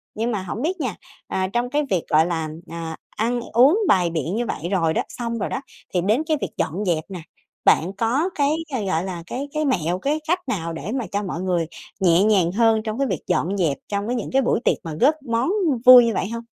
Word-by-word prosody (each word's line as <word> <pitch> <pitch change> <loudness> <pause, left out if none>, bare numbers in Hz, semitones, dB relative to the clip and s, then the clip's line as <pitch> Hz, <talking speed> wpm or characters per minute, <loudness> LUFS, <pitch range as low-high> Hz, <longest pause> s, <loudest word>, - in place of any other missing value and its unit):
Nhưng 230 +3 -1
mà 200 -4 -2
hổng 200 +6 -5
biết 360 +4 -1
nha, 245 -8 -2 0.3
à, 185 0 -1
trong 240 +1 0
cái 295 +2 +1
việc, 180 -4 +1
gọi 155 +1 +4
là, 160 -3 -2 0.2
ờ, 165 -1 -5
ăn 240 +3 -1
uống 270 - +6
bày 180 -3 +3
biện 165 +3 -2
như 240 +1 -1
vậy 170 -3 -4
rồi 165 -4 +2
đó, - - +1
xong 235 -1 -4
rồi - - -2
đó 260 - -3 0.3
thì 180 - +2
đến 215 - +1
cái 310 -2 +2
việc - - -2
dọn 195 +7 -2
dẹp 165 -3 0
nè, 185 -2 -6 0.5
bạn 180 +5 +4
có 255 - +1
cái, 285 -1 +2 0.4
gọi 165 -2 0
là, 180 -3 -5
cái 275 +8 -4
cái 305 0 0
mẹo 180 - 0
cái 295 +6 0
cách 350 +3 +2
nào 165 -4 -2
để 165 +6 -5
mà 245 -5 -2
cho 205 +1 -1
mọi 180 -2 -4
người 175 -3 0 0.3
nhẹ 180 0 +4
nhàng 195 -6 +3
hơn 225 +1 +3
trong 215 +1 -4
cái 275 - +1
việc - - -2
dọn 190 +6 0
dẹp 160 -7 +1
trong 200 +1 -2
cái 245 - -1
những 235 - -4
cái 270 - +3
buổi 240 - +1
tiệc - - +3
mà 160 -2 -5
góp 290 +5 +4
món 230 +4 0 0.4
vui 250 -1 +10
như 230 - 0
vậy 195 - -2
hông? 230 0 -5
205 Hz, 245 wpm, -22 LUFS, 175-245 Hz, 0.5 s, vui